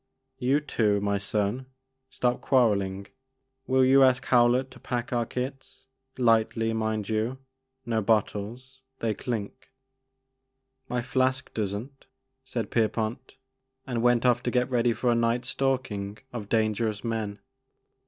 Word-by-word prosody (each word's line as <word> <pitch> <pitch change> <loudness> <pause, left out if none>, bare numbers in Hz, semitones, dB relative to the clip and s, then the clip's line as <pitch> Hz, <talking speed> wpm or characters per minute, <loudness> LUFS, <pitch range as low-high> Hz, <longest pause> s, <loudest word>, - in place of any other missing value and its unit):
You 135 +3 +2
too, 105 -8 +1
my 100 0 0
son; 105 +5 -1 0.4
stop 125 0 0
quarelling! 100 -7 +2 0.6
Will 130 0 +4
you 135 +1 +6
ask 130 0 +4
Howlett 125 +2 +3
to 125 - -13
pack 120 -1 -3
our 120 -2 0
kits 130 +1 -6 0.2
— 130 - -52
^lightly 115 -1 +2
mind 110 -2 -1
you, 110 +4 -1 0.2
— 130 0 -52
no 115 -2 0
bottles, 115 +5 -1
— 130 - -49
^they 110 -2 -1
clink." 115 0 -5 1.2
My 125 -1 -1
flask 130 +1 0
does 100 -3 -1
n't," 130 +7 -9 0.4
said 120 -5 -4
Pierpont, 115 +2 -1 0.5
and 120 -3 -2
went 120 0 +3
off 120 -1 +4
to 120 - -1
get 125 +1 0
ready 120 -1 +3
for 120 +2 +1
a - - +3
night's 115 +1 +1
stalking 115 -7 -1 0.2
of 105 -4 -6
dan 110 -1 +2
gerous 110 -1 -2
men. 110 -3 -2
120 Hz, 145 wpm, -27 LUFS, 110-130 Hz, 1.2 s, you